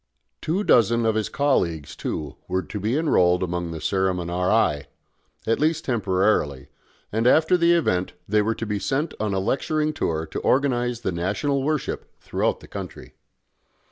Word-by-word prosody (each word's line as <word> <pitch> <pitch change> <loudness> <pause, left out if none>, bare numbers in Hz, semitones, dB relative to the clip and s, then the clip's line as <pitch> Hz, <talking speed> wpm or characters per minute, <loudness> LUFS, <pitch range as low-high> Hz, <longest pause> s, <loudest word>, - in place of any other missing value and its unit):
Two 180 +6 -1
dozen 115 - +4
of 110 - +3
his 110 -1 -1
colleagues, 85 - 0
too, 75 -3 -4
were 95 +1 -1
to 105 - -6
be 110 +7 0
enrolled 90 - +3
among 85 -1 -2
the 80 - -5
ceremoniarii, 90 -2 +1 0.6
at 115 - +1
least 155 +1 +1
temporarily 95 - 0 0.4
and 115 +3 +1
after 160 +7 +5
the 170 -1 +4
event 95 - +1
they 105 +1 +3
were 110 +2 0
to 115 - -4
be 105 -1 -2
sent 145 +9 -1
on 105 -2 -1
a - - +1
lecturing 155 +9 0
tour 80 - -1
to - - -5
organise 125 -3 +1
the - - -1
national 100 - -1
worship 150 +1 -2
throughout - - -1
the - - -13
country. - - -8
110 Hz, 160 wpm, -24 LUFS, 90-140 Hz, 0.6 s, after